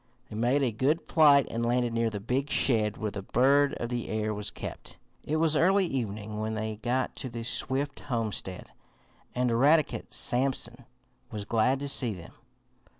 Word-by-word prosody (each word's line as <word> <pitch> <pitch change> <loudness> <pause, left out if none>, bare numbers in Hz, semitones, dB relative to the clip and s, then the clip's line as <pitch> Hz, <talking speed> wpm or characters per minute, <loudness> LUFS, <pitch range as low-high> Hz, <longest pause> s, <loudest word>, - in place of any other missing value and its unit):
They - - -6
made 125 +6 +1
a 125 - +1
good 135 +9 +1
flight 145 -4 +5
and 115 +1 -2
landed 120 0 +1
near 115 0 +1
the 105 -2 -5
big 130 +7 -2
shed 110 -6 +2
where 110 -2 -3
the 100 - -5
bird 140 +7 +3
of 120 - -4
the 120 -1 -3
air 110 0 -1
was 105 0 -4
kept. - - -9 0.3
It 155 - -2
was 160 -1 +2
early 190 +5 +4
evening 105 - -4
when 110 +1 -2
they 110 0 -3
got 125 +3 -1
to 130 - -4
the 115 -1 -6
Swift 135 +4 -2
homestead, 110 -7 -4 0.6
and 125 -1 +1
Eradicate 135 0 +2
Sampson 125 -1 0 0.4
was 105 -2 -6
glad 120 +5 +1
to 140 - -3
see 125 -6 +1
them. 85 - -12
120 Hz, 175 wpm, -28 LUFS, 110-135 Hz, 0.6 s, flight